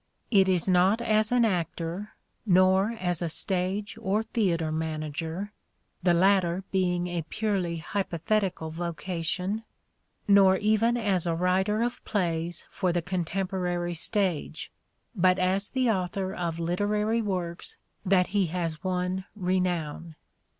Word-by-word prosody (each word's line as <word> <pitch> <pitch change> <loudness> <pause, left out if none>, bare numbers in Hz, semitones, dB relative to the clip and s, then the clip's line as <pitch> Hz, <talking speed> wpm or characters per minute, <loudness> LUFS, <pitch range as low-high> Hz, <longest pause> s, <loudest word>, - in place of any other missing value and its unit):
It 195 -3 +5
is 180 -1 +1
not 185 +4 +4
as 215 -1 +2
an 245 -1 +4
actor, 175 +1 -2 0.3
nor 190 0 +4
as 180 -6 -2
a 170 - -1
stage 190 +4 -2
or 205 +3 +1
theatre 170 -9 0
manager 160 +4 -3 0.3
— - - -46
the 175 -1 +3
latter 185 0 +3
being 180 -2 +1
a 175 -1 -2
purely 190 -6 -1
hypo 180 +1 -3
thetical 185 -3 -1
vocation 175 +4 -3 0.3
— - - -47 0.3
nor 195 -2 +6
even 220 +4 +2
as 195 -6 0
a 165 - +1
writer 190 +5 +1
of 240 0 -3
plays 170 -4 -1
for 185 - 0
the 170 -1 -1
contemporary 180 0 -2
stage, 180 -1 -1 0.4
but 185 -1 +4
as 190 +2 +1
the 255 -3 +2
author 190 0 -2
of 170 -2 -3
literary 210 +6 0
works 180 -5 -3 0.3
that 185 -1 +3
he 200 -3 +3
has 165 -1 -3
won 185 0 -1
renown. 180 -4 -1
185 Hz, 135 wpm, -27 LUFS, 170-200 Hz, 0.4 s, nor